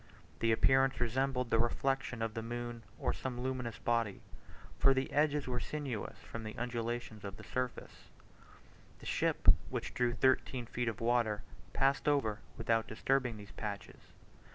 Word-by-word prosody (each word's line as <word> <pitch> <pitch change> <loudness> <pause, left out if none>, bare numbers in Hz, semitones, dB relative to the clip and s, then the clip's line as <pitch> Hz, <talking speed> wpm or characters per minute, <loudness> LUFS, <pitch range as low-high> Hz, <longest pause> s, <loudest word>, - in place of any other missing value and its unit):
The 115 - +3
appearance 135 +3 +4
resembled 125 +1 0
the 115 - +4
reflection 125 0 0
of 115 -1 -2
the 115 - -3
moon, 120 0 -4 0.2
or - - 0
some 125 -2 -4
luminous 125 -3 -2
body; 115 -4 0 0.6
for 135 0 +6
the 130 0 0
edges 150 -1 +3
were 125 -1 -1
sinuous 135 -6 -4
from 115 - -6
the 110 0 -6
undulations 120 -2 -3
of 100 -1 -6
the - - -10
surface. 125 -1 -4 0.9
The - - -13
ship, - - 0 0.2
which - - -3
drew 125 -1 +2
thirteen 130 -2 +2
feet 120 +1 -2
of 115 - -2
water, 115 -3 +2 0.3
passed 135 +1 +2
over, 120 -8 +2 0.2
without 115 -1 +1
disturbing 125 +1 +1
these 105 0 -10
patches. 105 -2 -5
120 Hz, 155 wpm, -34 LUFS, 115-130 Hz, 0.9 s, for